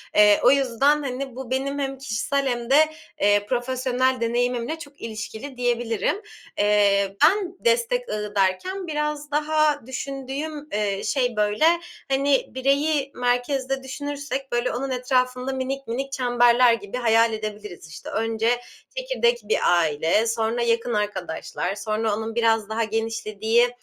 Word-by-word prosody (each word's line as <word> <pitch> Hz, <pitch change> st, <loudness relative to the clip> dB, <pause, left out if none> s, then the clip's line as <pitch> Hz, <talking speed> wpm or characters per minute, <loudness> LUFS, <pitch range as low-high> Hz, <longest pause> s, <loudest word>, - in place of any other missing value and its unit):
Eee, 210 Hz, -1 st, +6 dB
o 250 Hz, -, +7 dB
yüzden, 275 Hz, +2 st, +2 dB
hani, 265 Hz, -1 st, -4 dB
bu 260 Hz, -1 st, -7 dB
benim 275 Hz, +2 st, -1 dB
hem 270 Hz, -1 st, -2 dB
kişisel 270 Hz, +2 st, -1 dB
hem 240 Hz, -2 st, -2 dB
de, 270 Hz, -, +5 dB, 0.5 s
eee, 205 Hz, 0 st, +3 dB
profesyonel 255 Hz, +1 st, 0 dB
deneyimimle 245 Hz, +5 st, -1 dB
çok 285 Hz, -3 st, -12 dB
ilişkili 220 Hz, +4 st, -7 dB
diyebilirim. 240 Hz, -, 0 dB, 0.4 s
Eee, 200 Hz, -1 st, +3 dB
ben 380 Hz, -3 st, +3 dB
destek 480 Hz, +1 st, +1 dB
ağı 210 Hz, -1 st, -4 dB
derken 275 Hz, -, 0 dB
biraz 300 Hz, -1 st, -3 dB
daha 300 Hz, -2 st, +1 dB
düşündüğüm, 275 Hz, +3 st, -5 dB
eee, 205 Hz, -2 st, -1 dB
şey, 245 Hz, -4 st, 0 dB
böyle, 210 Hz, +7 st, +2 dB, 0.5 s
hani, 275 Hz, 0 st, +2 dB
bireyi 275 Hz, +2 st, +1 dB
merkezde 260 Hz, +2 st, 0 dB
düşünürsek, 280 Hz, 0 st, -5 dB
böyle, 240 Hz, +1 st, 0 dB
onun 270 Hz, +3 st, -3 dB
etrafında 255 Hz, 0 st, 0 dB
minik 265 Hz, +1 st, -4 dB
minik 270 Hz, +4 st, -3 dB
çemberler 245 Hz, -2 st, +4 dB
gibi 230 Hz, 0 st, -4 dB
hayal 230 Hz, -1 st, +3 dB
edebiliriz. 210 Hz, -5 st, -6 dB
İşte, 155 Hz, -, -9 dB
önce 225 Hz, 0 st, 0 dB, 0.5 s
"çekirdek -, -, +1 dB
bir 460 Hz, -, +1 dB, 0.2 s
aile", 165 Hz, +7 st, +1 dB
sonra 225 Hz, +1 st, 0 dB
"yakın 235 Hz, 0 st, +1 dB
arkadaşlar", 195 Hz, -2 st, -3 dB
sonra 215 Hz, +1 st, -1 dB
onun 220 Hz, +1 st, -5 dB
biraz 225 Hz, -2 st, +2 dB
daha 225 Hz, +1 st, 0 dB
genişlediği, 225 Hz, +1 st, 0 dB
245 Hz, 135 wpm, -24 LUFS, 220-275 Hz, 0.5 s, o